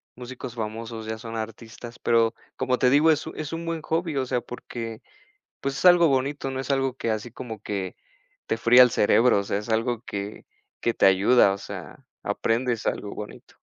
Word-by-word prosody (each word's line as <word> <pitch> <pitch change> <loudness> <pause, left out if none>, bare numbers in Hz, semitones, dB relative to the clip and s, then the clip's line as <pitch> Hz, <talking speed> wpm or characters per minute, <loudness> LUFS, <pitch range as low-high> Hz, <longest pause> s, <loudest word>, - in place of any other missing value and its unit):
músicos 125 0 -8
famosos, 110 0 -5
ya 110 0 -3
son 115 0 -8
artistas. 115 +2 -8
Pero, 115 -1 +2 0.2
como 130 -1 0
te 125 - +4
digo, 150 +4 +5
es 150 - 0
un - - -7
es 155 -1 -4
un 165 +1 -4
buen 165 -1 -3
hobby, 160 0 -1
o 130 - 0
sea, 125 -1 -1
porque, 115 -2 -7 0.6
pues, 135 0 -2
es - - -5
algo 175 -2 +7
bonito, 135 0 0
no 130 - -4
es 135 - -6
algo 135 -2 +1
que 115 - -2
así 110 +2 -3
como 115 -4 -7
que 95 -4 -4 0.5
te - - 0
fría 120 +2 +7
el 125 - +6
cerebro, 115 +1 +4
o - - -5
sea, 100 - -1
es 105 - -8
algo 115 +1 0
que 100 +1 -6 0.3
que 120 - 0
te - - +1
ayuda, 100 +3 +5
o 100 - -4
sea, - - -9 0.2
aprendes 115 0 -1
algo 100 - -2
bonito. 105 - -10
120 Hz, 200 wpm, -25 LUFS, 110-135 Hz, 0.6 s, algo